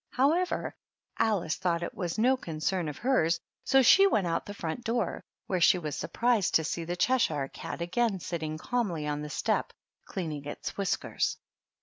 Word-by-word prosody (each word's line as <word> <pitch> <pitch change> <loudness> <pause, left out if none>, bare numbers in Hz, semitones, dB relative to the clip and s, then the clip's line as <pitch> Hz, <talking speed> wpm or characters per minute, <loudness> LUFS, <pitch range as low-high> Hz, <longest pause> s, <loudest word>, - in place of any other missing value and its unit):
However, 320 +8 +1 0.5
Alice 200 -8 +1
thought 170 -2 0
it - - -4
was 175 -1 -3
no 250 +4 +4
concern 165 -4 -2
of 150 - -7
hers, 170 -11 +2 0.2
so 270 -1 +5
she 390 +10 +7
went 210 - +2
out 165 - -1
to - - -10
the 205 - -6
front 165 +9 -4
door, 235 -3 -1 0.2
where 185 -2 -1
she 180 - +6
was 155 -5 -4
surprised 235 -5 +1
to 160 - +5
see 165 +2 -2
the 175 +2 -2
Cheshire 160 - +1
cat 170 - -5
again 195 +3 0
sitting 160 -3 -4
calmly 180 -6 -1
on 150 0 -2
the 150 - -5
step - - 0 0.4
cleaning 155 -7 -4
its 145 - -5
whiskers. 200 -2 -1
180 Hz, 180 wpm, -29 LUFS, 160-235 Hz, 0.5 s, she